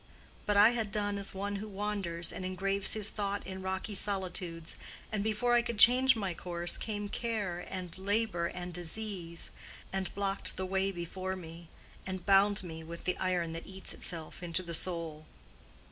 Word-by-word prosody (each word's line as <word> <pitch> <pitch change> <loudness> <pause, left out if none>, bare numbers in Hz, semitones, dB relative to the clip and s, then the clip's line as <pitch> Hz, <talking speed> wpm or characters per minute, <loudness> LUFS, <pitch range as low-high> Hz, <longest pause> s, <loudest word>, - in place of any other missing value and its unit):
But 205 -1 +3
I 210 +3 +8
had 225 -4 -1
done 205 -1 0
as 200 0 -3
one 200 +1 -2
who 210 +2 -5
wanders 195 -4 +1
and 185 - -5
engraves 195 +2 +1
his 215 -1 +2
thought 200 -1 -2
in 190 0 -6
rocky 190 +3 -3
solitudes, 185 -4 -1 0.4
and 210 -2 0
before 220 +3 +1
I 240 - +6
could 235 -2 -4
change 250 +4 +8
my 195 -5 -2
course 175 0 +2
came 205 -2 -3
care 205 -6 -2
and 180 -3 -5
labor 200 -3 +1
and 180 0 -6
disease, 175 -1 -3 0.4
and 190 -1 -1
blocked 195 0 -1
the 190 - -1
way 190 +1 +1
before 185 +1 -4
me, 165 -2 -10 0.3
and 185 -2 -5
bound 200 +1 +5
me 160 -2 -7
with 170 +1 -8
the 180 - 0
iron 180 -3 0
that 165 0 -7
eats 190 0 -6
itself 165 -1 -6
into 175 +1 0
the 170 -1 -6
soul. 165 -3 +1
190 Hz, 175 wpm, -32 LUFS, 175-205 Hz, 0.4 s, I